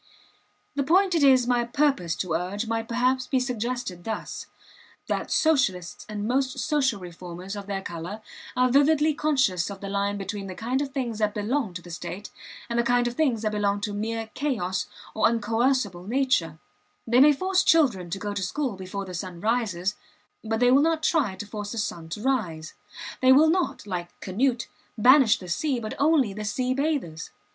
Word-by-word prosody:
The 285 - -1
point 365 +6 +3
it 330 - +2
is 260 -3 +6
my 245 -1 +2
purpose 240 - +1
to 180 -4 -3
urge 185 +6 -2
might 225 0 -2
perhaps 255 +2 +1
be 265 - +1
suggested 245 -6 -3
thus: 220 +2 -5 0.6
that - - -2
Socialists 215 - +1
and 210 0 -3
most 260 +1 0
social 270 -8 +1
reformers 180 +2 -8
of 200 -1 -7
their 195 -1 -3
color 175 +6 -6 0.3
are 250 0 +3
vividly 300 +3 +4
conscious 260 - +1
of 200 -1 -7
the 195 - -6
line 200 0 -1
between 200 0 -5
the 185 - -7
kind 250 +8 -1
of 285 - -2
things 245 -5 -3
that 210 -1 0
belong 215 -1 -1
to 180 - -6
the 175 - -11
state 185 +4 -7 0.4
and 235 0 -1
the - - +3
kind 245 0 +2
of 240 - -2
things 245 -6 +1
that 215 - 0
belong 205 -1 0
to 205 -1 -3
mere 220 +1 -3
chaos 215 -11 -1 0.3
or 220 - +3
uncoercible 225 -4 0
nature; 240 - +1 0.5
they 240 +2 +3
may 295 +3 +8
force 370 +6 +1
children 235 - +3
to 185 - -3
go 205 +1 -4
to 205 - -3
school 260 +3 -2
before 190 +1 -6
the 185 - -8
sun 175 0 -6
rises, 210 -3 0 0.5
but 225 0 -1
they 245 0 +5
will 270 +2 +6
not 320 0 +1
try 280 - +2
to 205 - -7
force 205 0 -6
the - - -6
sun 170 -6 -3
to 210 +6 -6
rise; 180 -13 -1 0.5
they 260 0 +6
will 310 +4 +6
not, 360 - -1
like 175 -3 -5
Canute, 235 +5 0 0.3
banish 250 0 +6
the 185 - -10
sea, 255 - -1
but 215 -2 -5
only 285 -8 +3
the 215 +2 -5
sea 250 +5 -1
bathers. 275 - -2
225 Hz, 190 wpm, -26 LUFS, 195-265 Hz, 0.6 s, may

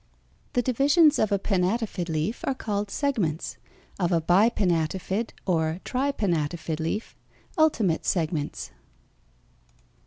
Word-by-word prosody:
3). - - -37 0.5
The 245 - +3
divisions 285 +6 +4
of 215 - +2
a 200 - +3
pinnátifid 195 -1 -1
leaf 160 +9 -2
are 270 - +1
called 205 -3 -3
segments; 195 - -1 0.4
of 175 -1 +1
a 170 - +3
bipinnátifid 185 +2 +1 0.2
or 160 -2 0
tripinnátifid 170 - -1
leaf, 165 +7 -3 0.4
ultimate 235 - +2
segments. 160 -4 -2
190 Hz, 105 wpm, -26 LUFS, 165-230 Hz, 0.5 s, divisions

